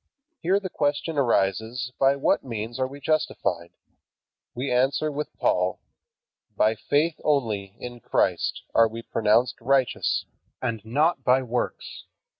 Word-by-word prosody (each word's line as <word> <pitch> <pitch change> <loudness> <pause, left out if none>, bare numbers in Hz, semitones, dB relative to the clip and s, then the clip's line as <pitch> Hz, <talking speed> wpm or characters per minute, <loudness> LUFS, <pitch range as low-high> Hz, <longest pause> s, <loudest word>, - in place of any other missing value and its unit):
Here 190 +4 +2
the 200 - -4
question 145 +2 -1
arises 115 +1 0
by 135 +1 +4
what 140 - +1
means 115 0 -5
are 130 - +1
we 140 +2 -10
justified? 150 - -1 0.9
We 125 +2 -2
answer 135 +5 +2
with 150 +1 -5
Paul, 90 +1 +1 0.8
"By 110 - +4
faith 150 +8 0
only 110 -9 0
in 120 0 -8
Christ - - 0
are 115 - +6
we 115 +1 -8
pronounced 115 +3 +2
righteous, 130 +1 +1 0.3
and 115 -4 -3
not 140 +5 +1
by 130 +1 +4
works." 125 0 -4
125 Hz, 130 wpm, -25 LUFS, 115-145 Hz, 0.9 s, are